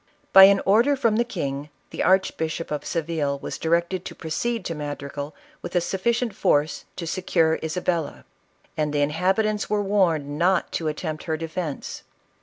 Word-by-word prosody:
By 190 0 +11
an 195 0 +5
order 230 +9 +4
from 230 -5 +1
the 235 - +3
king, 145 - -4 0.2
the - - -4
Archbishop 165 -4 +1
of 150 - -2
Se 165 - 0
ville 150 -3 -2
was - - -6
directed 170 +3 0
to - - -7
proceed 200 +7 -3
to 165 - -2
Madrigal 145 -1 -6 0.3
with - - -7
a - - +5
suf 185 +2 -4
ficient 235 -1 +1
force 150 -5 +1
to 170 - -5
secure 165 -2 +1
Isabella; 160 -1 -2 0.5
and 150 -1 0
the 145 - +1
inhabitants 190 +8 0
were 210 -1 +1
warned 165 -8 +1
.not 185 +2 +2
to 160 - -2
attempt 155 0 -4
her 160 -1 -1
defence. 165 -2 -5
170 Hz, 170 wpm, -24 LUFS, 155-195 Hz, 0.5 s, By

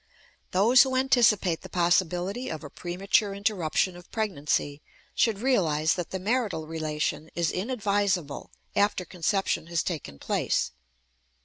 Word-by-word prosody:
Those 225 +7 +5
who 260 -1 +2
anticipate 230 -10 +3
the - - -10
possibility 180 +6 +1
of 155 - -5
a 145 - -9
premature 195 +3 0
interruption 190 -3 0
of 175 0 -14
pregnancy 150 -8 -1 0.3
should 225 -4 +2
realize 170 - +2
that 175 -2 -4
the 190 - -3
marital 205 -5 -1
relation 155 0 -3
is 170 -1 +1
inadvisable 200 - -1 0.3
after 200 -2 +2
conception 180 -2 -1
has 170 -1 0
taken 145 - -5
place. - - 0
185 Hz, 125 wpm, -27 LUFS, 160-210 Hz, 0.3 s, Those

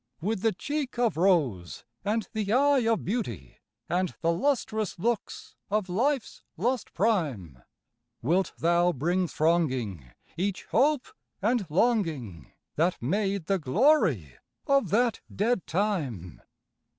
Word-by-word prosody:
With 205 +2 -2
the 225 - +3
cheek 285 +6 -4
of 240 -2 +2
rose 150 - +1 0.2
and 215 +2 -1
the 210 -2 -2
eye 270 -1 +4
of 225 - -1
beauty, 120 - -4 0.3
And 180 +1 -1
the 165 - +2
lustrous 220 0 -1
looks 225 +4 -3
of 205 -2 0
life's 255 +7 -1 0.2
lost 240 +7 -1
prime, 145 - 0 0.6
Wilt 175 +7 +1
thou 175 +1 +3
bring 175 +7 0
thronging 130 - 0 0.3
each 190 +3 -2
hope 290 -1 +2 0.3
and 220 -1 +1
longing 155 - 0 0.3
That 170 +4 +1
made 195 - -1
the 195 +2 +1
glory 150 - +2 0.3
of 275 -1 +2
that 235 +2 +2
dead 225 0 0
Time? 150 - -2
190 Hz, 120 wpm, -27 LUFS, 155-225 Hz, 0.6 s, eye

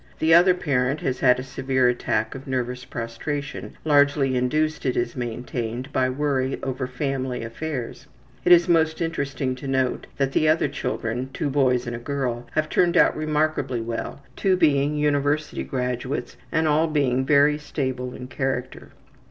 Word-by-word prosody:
The 160 +1 +3
other 180 +2 +7
parent 140 -4 0
has 130 -1 -2
had 125 -1 +5
a - - -4
severe 130 -1 0
attack 110 -2 0
of 135 0 -9
``nervous 125 -1 -3
prostration,'' 135 +5 -5
largely 145 -3 +3
induced, 155 +5 0
it 130 -2 0
is 120 - -1
maintained, 120 +1 -4
by 130 0 +2
worry 135 -1 0
over 130 -1 -2
family 130 -2 -3
affairs. 125 +2 -5 0.4
It 180 - +3
is 175 -1 +7
most 160 -2 +2
interesting 140 -5 -2
to 130 +2 -8
note 130 -1 0
that 135 -1 +1
the 155 +2 +2
other 160 +1 +3
children, 125 0 -3
two 145 - -2
boys 130 -3 +2
and 120 -1 -4
one 120 - -12
girl, 125 -4 -2
have 155 0 +1
turned 175 +2 +2
out - - +5
remarkably 155 -4 0
well; 115 +4 -5
two 190 -1 +2
being 150 -3 +3
university 150 0 0
graduates, 125 +1 -3 0.2
and 160 -1 +2
all 155 +2 +3
being 135 -4 +1
very 145 +2 +4
stable 130 -4 -3
in 125 - -8
character. 130 0 -3
135 Hz, 160 wpm, -24 LUFS, 125-150 Hz, 0.4 s, other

